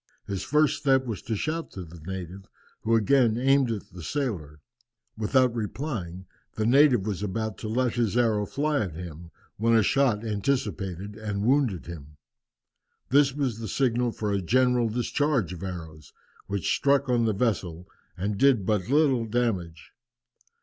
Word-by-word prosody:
His 100 -2 -4
first 150 0 +2
step 135 -2 +2
was 110 -7 -4
to 110 - -3
shout 160 +9 -3
to 95 - -6
the 85 0 -12
native, 95 +1 -7 0.3
who 115 +1 +2
again 115 0 +3
aimed 135 0 +3
at 110 -3 -4
the 90 0 -10
sailor. 85 - -3 0.6
Without 125 +3 +2
replying, 105 - -4 0.3
the 110 - -1
native 130 -4 +5
was 100 -3 -3
about 110 +1 -3
to 110 - -5
let 120 +2 0
his 115 -2 0
arrow 110 -4 +2
fly 150 0 0
at 90 -7 -3
him, 85 -1 -8 0.3
when 115 +2 +3
a 110 - +5
shot 120 -3 +2
anticipated 100 - -2
and 105 -2 -4
wounded 125 - +2
him. 75 -3 -10 0.9
This 140 -1 +4
was 130 -6 -1
the 110 - -5
signal 120 +1 +1
for 105 -2 -3
a 100 -1 0
general 125 +4 +2
discharge 125 - 0
of 90 - -9
arrows, 80 -5 -8 0.3
which 100 -1 -1
struck 140 0 +2
on 120 -2 +2
the 110 - +1
vessel 95 -6 -2 0.3
and 100 +2 -2
did 130 -7 +4
but 105 0 0
little 135 -5 +3
damage. 95 -9 -2
110 Hz, 160 wpm, -26 LUFS, 95-130 Hz, 0.9 s, native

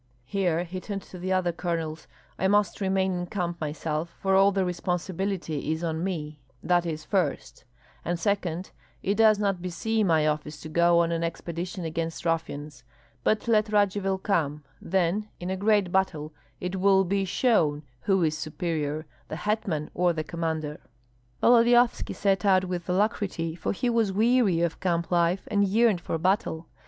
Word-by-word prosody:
Here 175 +1 0
he 185 +1 -6
turned 195 0 -5
to 180 - -11
the 185 +2 -3
other 185 -2 +2
colonels: 165 -2 -3 0.3
"I 190 - +2
must 205 +1 +2
remain 190 -1 +1
in 175 0 -3
camp 175 -3 -3
myself, 155 +2 -3
for 190 0 +1
all 195 +1 +6
the 195 -1 0
responsibility 180 -3 -2
is 160 +2 -2
on 160 0 -2
me, 155 -5 -4 0.2
that 175 -1 +2
is, 155 -1 -4
first; 190 0 -2 0.4
and 175 0 -2
second, 185 -2 -1 0.3
it 200 - +1
does 215 0 +5
not 200 -3 0
beseem 210 +4 -1
my 160 -3 +3
office 150 0 -2
to 155 - -8
go 170 +1 +4
on 170 0 0
an 165 0 -1
expedition 170 +2 -4
against 165 +1 -4
ruffians. 150 -5 -3 0.4
But 215 +2 +1
let 215 -2 +3
Radzivill 200 -2 +2
come, 150 -7 0 0.2
then 190 +4 0
in 180 +1 -4
a - - 0
great 205 -2 +2
battle 160 -5 0 0.3
it 180 +1 -3
will 195 0 +4
be 195 +2 0
shown 175 - +2 0.2
who 195 +1 +2
is 155 -1 +1
superior, 155 -1 -3 0.2
the - - -5
hetman 185 -5 -2
or 175 0 +2
the 155 -1 -3
commander." 160 -2 -3 0.6
Volodyovski 240 0 +4
set 195 -2 +1
out 190 -2 +4
with 180 -1 -4
alacrity, 185 -4 0
for 170 - -3
he 245 - -2
was 230 -4 +2
weary 215 -4 +3
of 170 -1 -1
camp 170 -2 -1
life 175 +2 +1
and 200 -1 +3
yearned 215 -2 +3
for 165 - -2
battle. 175 -2 0
180 Hz, 165 wpm, -27 LUFS, 165-195 Hz, 0.6 s, all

